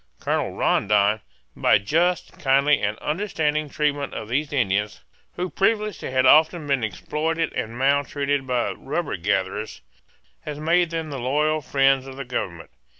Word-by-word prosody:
Colonel -, -, -1 dB
Rondon, 105 Hz, +1 st, +2 dB, 0.3 s
by -, -, +4 dB
just, 165 Hz, -, 0 dB
kindly, 140 Hz, +1 st, +3 dB
and 105 Hz, +1 st, -1 dB
understanding 155 Hz, -, -1 dB
treatment 145 Hz, -1 st, -1 dB
of 110 Hz, -, -6 dB
these 140 Hz, +4 st, -1 dB
Indians, 105 Hz, -6 st, 0 dB, 0.3 s
who 180 Hz, +1 st, -2 dB
previously 210 Hz, +1 st, 0 dB
had 130 Hz, 0 st, +2 dB
often 155 Hz, +3 st, +5 dB
been 135 Hz, -4 st, 0 dB
exploited 160 Hz, -, -2 dB
and 115 Hz, +2 st, -4 dB
maltreated 140 Hz, 0 st, 0 dB
by 125 Hz, -2 st, 0 dB
rubber 150 Hz, +3 st, -3 dB
gatherers, 95 Hz, +3 st, -2 dB, 0.6 s
has 150 Hz, -1 st, -6 dB
made 170 Hz, +2 st, +2 dB
them 160 Hz, -2 st, -4 dB
the 135 Hz, -, -4 dB
loyal 150 Hz, +5 st, +1 dB
friends 135 Hz, -1 st, +2 dB
of 135 Hz, 0 st, -9 dB
the 140 Hz, -, -5 dB
government. 85 Hz, -9 st, -5 dB
140 Hz, 145 wpm, -23 LUFS, 120-155 Hz, 0.6 s, often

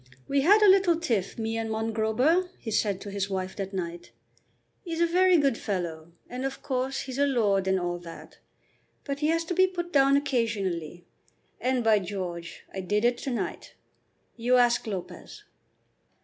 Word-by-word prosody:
"We 280 Hz, 0 st, +2 dB
had 410 Hz, +8 st, +5 dB
a -, -, +7 dB
little 375 Hz, -4 st, +5 dB
tiff, 225 Hz, -, -1 dB
me 225 Hz, 0 st, -2 dB
and 225 Hz, 0 st, -3 dB
Mongrober," 225 Hz, +10 st, +1 dB
he 225 Hz, -, -6 dB
said 205 Hz, -2 st, +1 dB
to 205 Hz, -, -7 dB
his 200 Hz, 0 st, -2 dB
wife 190 Hz, -1 st, -3 dB
that 195 Hz, -1 st, -4 dB
night. 175 Hz, -2 st, -5 dB, 0.7 s
"'E's 335 Hz, -2 st, -4 dB
a 340 Hz, -, +4 dB
very 365 Hz, +1 st, +4 dB
good 275 Hz, -6 st, +1 dB
fellow, 170 Hz, -5 st, -4 dB, 0.2 s
and 250 Hz, +1 st, -6 dB
of 270 Hz, 0 st, -4 dB
course 265 Hz, 0 st, -2 dB
he's 260 Hz, 0 st, -6 dB
a 285 Hz, -, +4 dB
lord 205 Hz, -7 st, +1 dB
and 190 Hz, 0 st, +2 dB
all 175 Hz, 0 st, -3 dB
that. 170 Hz, -1 st, -12 dB, 0.6 s
But 280 Hz, -1 st, -4 dB
he 300 Hz, -, +1 dB
has 330 Hz, +1 st, +1 dB
to 355 Hz, -, -2 dB
be 375 Hz, +2 st, +4 dB
put 350 Hz, -1 st, -5 dB
down 275 Hz, 0 st, +5 dB
occasionally, 200 Hz, -, -2 dB, 0.5 s
and, 255 Hz, -1 st, 0 dB
by 220 Hz, -2 st, +4 dB
George, 180 Hz, -3 st, -6 dB
I 195 Hz, -, -4 dB
did 205 Hz, +4 st, 0 dB
it 240 Hz, 0 st, +2 dB
to -, -, -4 dB
night. 240 Hz, -, -4 dB, 0.6 s
You 245 Hz, +2 st, +2 dB
ask 240 Hz, -1 st, +3 dB
Lopez." 190 Hz, -4 st, -7 dB
230 Hz, 175 wpm, -27 LUFS, 195-280 Hz, 0.7 s, a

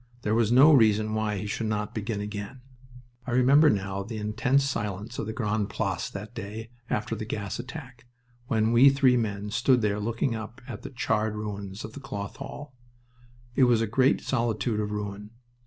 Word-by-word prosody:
There 105 Hz, -, +1 dB
was 115 Hz, -1 st, +2 dB
no 140 Hz, +6 st, +8 dB
reason 110 Hz, -4 st, +4 dB
why 110 Hz, -1 st, -1 dB
he 100 Hz, -, -4 dB
should 110 Hz, +2 st, -2 dB
not 105 Hz, -1 st, -2 dB
begin 110 Hz, -1 st, -3 dB
again... 105 Hz, +5 st, -6 dB, 0.7 s
I -, -, -2 dB
remember 140 Hz, +5 st, +6 dB
now 100 Hz, -1 st, -1 dB
the 110 Hz, +3 st, -6 dB
intense 110 Hz, +6 st, +1 dB
silence 105 Hz, -3 st, -3 dB
of -, -, -3 dB
the -, -, -2 dB
Grande 110 Hz, -2 st, -1 dB
Place 95 Hz, -5 st, -2 dB
that 105 Hz, +3 st, -8 dB
day 110 Hz, 0 st, -7 dB, 0.2 s
after 105 Hz, +2 st, -1 dB
the 110 Hz, -, -5 dB
gas 105 Hz, -1 st, -4 dB
attack, 125 Hz, -3 st, -9 dB, 0.4 s
when 110 Hz, -1 st, +2 dB
we 125 Hz, +4 st, +8 dB
three 135 Hz, -2 st, +4 dB
men 105 Hz, -3 st, -2 dB
stood 125 Hz, +2 st, +3 dB
there 105 Hz, 0 st, +1 dB
looking 115 Hz, +3 st, -1 dB
up 110 Hz, +2 st, -7 dB
at 120 Hz, -5 st, -7 dB
the -, -, -7 dB
charred 110 Hz, -4 st, -1 dB
ruins 100 Hz, -1 st, -5 dB
of 110 Hz, -, -10 dB
the -, -, -8 dB
Cloth 100 Hz, -7 st, -6 dB
Hall. 145 Hz, -2 st, -8 dB, 0.8 s
It 130 Hz, 0 st, +5 dB
was 120 Hz, -2 st, +4 dB
a 115 Hz, -, +1 dB
great 130 Hz, +5 st, +2 dB
solitude 115 Hz, -3 st, 0 dB
of 105 Hz, -1 st, -1 dB
ruin. 105 Hz, 0 st, -5 dB
110 Hz, 190 wpm, -27 LUFS, 105-125 Hz, 0.8 s, no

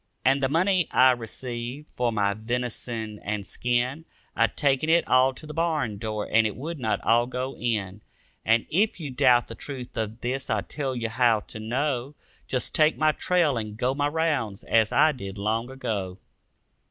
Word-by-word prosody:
And 135 Hz, +2 st, +4 dB
the 135 Hz, -, +2 dB
money 180 Hz, +2 st, +2 dB
I 130 Hz, 0 st, +6 dB
received 120 Hz, +3 st, -5 dB
for 120 Hz, -1 st, +1 dB
my 100 Hz, -2 st, +1 dB
venison 115 Hz, -1 st, -3 dB
and 105 Hz, -1 st, -3 dB
skin, 125 Hz, -, -1 dB, 0.3 s
I -, -, +4 dB
taken 140 Hz, +1 st, 0 dB
it 170 Hz, +1 st, +4 dB
all 130 Hz, +1 st, +5 dB
to 155 Hz, -, -9 dB
the 150 Hz, -, -8 dB
barn 155 Hz, -10 st, -1 dB
door 110 Hz, -1 st, -3 dB
and 110 Hz, 0 st, +4 dB
it 105 Hz, -, -6 dB
would 155 Hz, +4 st, -6 dB
not 110 Hz, -3 st, 0 dB
all 120 Hz, +1 st, +3 dB
go 130 Hz, +1 st, -4 dB
in. 105 Hz, -4 st, -2 dB, 0.4 s
And 115 Hz, +2 st, +3 dB
if 200 Hz, +4 st, +2 dB
you 150 Hz, -5 st, -5 dB
doubt 125 Hz, -2 st, +4 dB
the -, -, -9 dB
truth 125 Hz, 0 st, -7 dB
of 110 Hz, +1 st, -3 dB
this 130 Hz, +2 st, -3 dB
I 110 Hz, -2 st, +1 dB
tell 135 Hz, +3 st, -4 dB
you 115 Hz, -2 st, -2 dB
how 115 Hz, -2 st, +3 dB
to 110 Hz, -, -9 dB
know: 130 Hz, +4 st, -2 dB, 0.3 s
Just 130 Hz, -1 st, -2 dB
take 155 Hz, 0 st, +4 dB
my 155 Hz, 0 st, +4 dB
trail 165 Hz, -5 st, +1 dB
and 105 Hz, -1 st, -6 dB
go 125 Hz, +2 st, +1 dB
my 145 Hz, +1 st, 0 dB
rounds, 145 Hz, -10 st, -1 dB
as 110 Hz, -2 st, +2 dB
I 155 Hz, +2 st, +5 dB
did, 100 Hz, -8 st, -7 dB
long 110 Hz, +4 st, -1 dB
ago. 100 Hz, -8 st, -4 dB
125 Hz, 185 wpm, -26 LUFS, 110-145 Hz, 0.4 s, I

